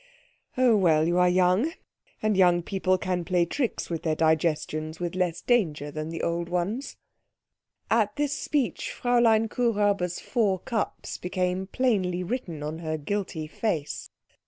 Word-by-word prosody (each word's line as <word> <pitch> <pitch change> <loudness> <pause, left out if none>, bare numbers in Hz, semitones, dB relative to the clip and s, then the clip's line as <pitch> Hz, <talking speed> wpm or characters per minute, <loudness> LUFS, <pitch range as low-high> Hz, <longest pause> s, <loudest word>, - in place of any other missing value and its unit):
Oh, 250 -3 +5
well, 160 -5 +3
you 175 +1 +2
are 180 0 +5
young, 185 - +3 0.5
and 215 -1 +2
young 175 -2 +4
people 185 0 +1
can 180 -1 -2
play 175 0 +2
tricks 245 - -2
with 165 -2 -3
their 160 -2 0
digestions 155 0 0
with 175 -1 -3
less 180 -2 -1
danger 155 - +1
than 155 +2 -5
old 170 0 -1
ones." 195 +10 -2 0.9
At 215 -2 +2
this 290 -1 0
speech 290 -3 -1
Fräulein 235 -2 +4
Kuhräuber's 205 -7 +1
four 210 -7 +1
cups 220 +3 -3
became 180 +1 -1
plainly 190 -7 0
written 175 - -4
on 155 +2 -4
her 155 -1 -3
guilty 165 0 -3
face. 155 -2 -3
180 Hz, 140 wpm, -26 LUFS, 165-220 Hz, 0.9 s, Oh